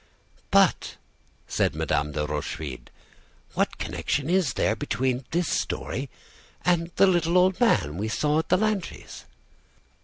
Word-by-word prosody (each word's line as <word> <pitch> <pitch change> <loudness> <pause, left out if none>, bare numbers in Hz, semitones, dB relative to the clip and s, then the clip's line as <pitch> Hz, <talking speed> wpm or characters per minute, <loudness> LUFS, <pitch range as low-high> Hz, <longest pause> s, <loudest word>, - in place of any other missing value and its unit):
"But," - - +3 0.5
said - - 0
Madame 75 +1 -1
de 75 0 -1
Rochefide, 75 -2 -5 0.6
"what - - 0
connection 145 +3 -2
is 180 -10 +2
there 110 - +1
between 125 +3 -1
this 170 0 0
story 135 +2 -2 0.6
and 170 -1 +2
the 195 - +6
little 175 -2 +2
old 185 +2 +3
man 155 - +2
we 105 +3 -2
saw 150 +7 +1
at 160 - -3
the - - +4
Lantys'?" 210 -3 -3
150 Hz, 130 wpm, -26 LUFS, -, 0.6 s, the